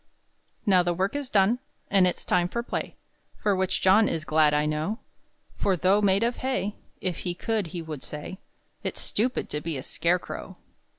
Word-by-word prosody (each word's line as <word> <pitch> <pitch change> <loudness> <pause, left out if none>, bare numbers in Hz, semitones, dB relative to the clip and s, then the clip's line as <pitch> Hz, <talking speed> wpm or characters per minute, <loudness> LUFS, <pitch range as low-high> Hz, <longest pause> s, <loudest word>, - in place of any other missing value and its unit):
Now 190 -4 +5
the 175 -1 0
work 190 +7 0
is 285 -3 -3
done, 210 +4 +3 0.3
And 195 -2 +5
it's 180 - -3
time 175 -1 +2
for 235 +6 -3
play, - - -4 0.4
For 205 -2 +1
which 190 0 0
John 205 +4 +5
is 160 -1 -2
glad 155 -1 +4
I 150 0 +2
know; 155 +8 -1 0.6
For 190 -2 +2
though 190 +5 +4
made 200 +1 +3
of 240 +1 0
hay, 255 -6 -1 0.3
If 185 -2 -2
he 175 -1 -3
could 215 0 -1
he 170 +1 -5
would 155 -4 -6
say, 150 +6 -6 0.4
"It's - - -3
stupid 245 +5 -1
to 150 - -2
be 160 -3 -3
a 130 - -5
scarecrow." 170 +4 -1
185 Hz, 185 wpm, -27 LUFS, 165-210 Hz, 0.6 s, Now